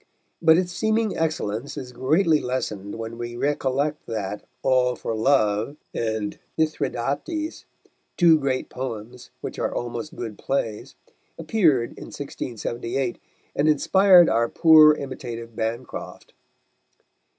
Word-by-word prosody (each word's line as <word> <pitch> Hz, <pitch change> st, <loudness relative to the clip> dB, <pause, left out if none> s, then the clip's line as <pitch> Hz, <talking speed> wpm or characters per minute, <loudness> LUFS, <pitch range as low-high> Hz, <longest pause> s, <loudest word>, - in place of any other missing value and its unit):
But 160 Hz, -1 st, +6 dB
its 180 Hz, 0 st, 0 dB
seeming 220 Hz, +1 st, 0 dB
excellence 140 Hz, -6 st, -2 dB
is 125 Hz, -2 st, -6 dB
greatly 155 Hz, +5 st, +2 dB
lessened 105 Hz, -6 st, -3 dB
when 115 Hz, +1 st, -6 dB
we 120 Hz, 0 st, -5 dB
recollect 145 Hz, +2 st, -1 dB
that 105 Hz, -2 st, -4 dB, 0.2 s
All 125 Hz, -1 st, +3 dB
for 115 Hz, -, -4 dB
Love 110 Hz, +1 st, +2 dB, 0.2 s
and 110 Hz, -2 st, -2 dB, 0.2 s
Mithridates, 155 Hz, -, -2 dB, 0.5 s
two 165 Hz, -3 st, +6 dB
great 135 Hz, -2 st, -1 dB
poems 125 Hz, -1 st, -7 dB
which -, -, -6 dB
are -, -, -1 dB
almost 120 Hz, +5 st, -5 dB
good 110 Hz, -4 st, -6 dB
plays, 115 Hz, -6 st, -3 dB, 0.4 s
appeared 160 Hz, -, +2 dB
in -, -, -10 dB
1678, 120 Hz, -1 st, -4 dB, 0.4 s
and 150 Hz, +2 st, +3 dB
inspired 180 Hz, +3 st, +6 dB
our 115 Hz, +1 st, +2 dB
poor 155 Hz, -2 st, +7 dB
imitative 120 Hz, -5 st, -7 dB
Bancroft. 115 Hz, +3 st, -5 dB
130 Hz, 115 wpm, -24 LUFS, 115-155 Hz, 0.5 s, poor